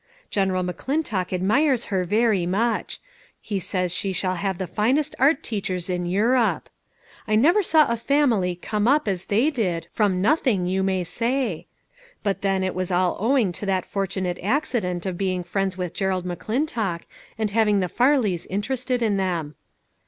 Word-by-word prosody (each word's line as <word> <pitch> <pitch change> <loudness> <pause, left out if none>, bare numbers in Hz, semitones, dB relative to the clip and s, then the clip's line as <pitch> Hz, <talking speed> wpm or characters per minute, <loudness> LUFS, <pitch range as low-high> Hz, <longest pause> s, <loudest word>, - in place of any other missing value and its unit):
General 190 -2 +1
McClintock 195 - -2
admires 235 - +2
her 185 -1 +1
very 210 -2 +2
much; 225 +6 -1 0.4
he 205 -3 -3
says 180 -1 -1
she 195 - 0
shall 185 0 -1
have 190 0 -2
the 190 - -3
finest 250 - 0
art 280 +5 +3
teachers 185 -4 -3
in 175 -1 -2
Europe. 225 +6 +1 0.6
I 215 - +2
never 330 - +5
saw 320 -5 +4
a 235 - 0
family 235 -8 +1
come 210 +4 -2
up 290 0 +3
as 190 -2 -1
they 235 +10 +2
did, 185 - -1
from 200 -4 +1
nothing, 220 - +2
you 190 +2 0
may 190 -1 0
say. 230 - -1 0.6
But 200 -2 -1
then 195 -1 +1
it 185 - -1
was 185 -1 -2
all 180 0 +1
ow 265 +5 +3
ing 215 -8 +2
to 190 - -6
that 190 -1 0
fortunate 190 -2 -2
accident 205 - -1
of 185 -2 -3
being 185 -2 -1
friends 190 +1 -2
with 180 -2 -3
Gerald 190 -2 -1
McClintock, 215 - -2 0.4
and 215 -2 -1
having 210 -2 +3
the 185 - 0
Farleys 240 - +1
interested 250 +5 -2
in 210 -3 +1
them. 170 -6 -2
195 Hz, 165 wpm, -23 LUFS, 185-235 Hz, 0.6 s, never